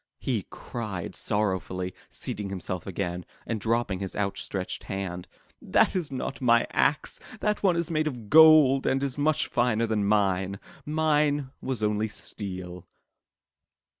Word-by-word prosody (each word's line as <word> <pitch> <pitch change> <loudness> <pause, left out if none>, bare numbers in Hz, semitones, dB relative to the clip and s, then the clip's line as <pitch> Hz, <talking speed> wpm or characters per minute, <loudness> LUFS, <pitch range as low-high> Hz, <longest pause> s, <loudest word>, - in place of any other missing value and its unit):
he - - -2
cried 105 -7 -6
sorrowfully, 95 -3 -1 0.2
seating 105 -1 -5
himself 95 -2 -5
again, 90 -2 -3 0.2
and 110 -3 -3
dropping 115 -4 0
his 95 -1 -4
outstretched 100 -1 -3
hand. 95 -3 -4 0.3
"That - - +3
is 175 -6 -1
not 135 +1 -4
my 120 -2 +4
axe. 150 +2 +1 0.2
That 210 0 0
one 185 -4 +3
is 170 0 -1
made 155 -1 +1
of 120 -7 -5
gold 155 -2 +7
and 135 +1 +1
is 140 0 -2
much 155 +1 +2
finer 120 -2 +1
than 110 -2 0
mine. 100 -2 +1 0.3
Mine 150 -3 +1
was 125 -5 -2
only 105 +1 +1
steel." 90 -4 -8
110 Hz, 135 wpm, -27 LUFS, 95-140 Hz, 0.3 s, gold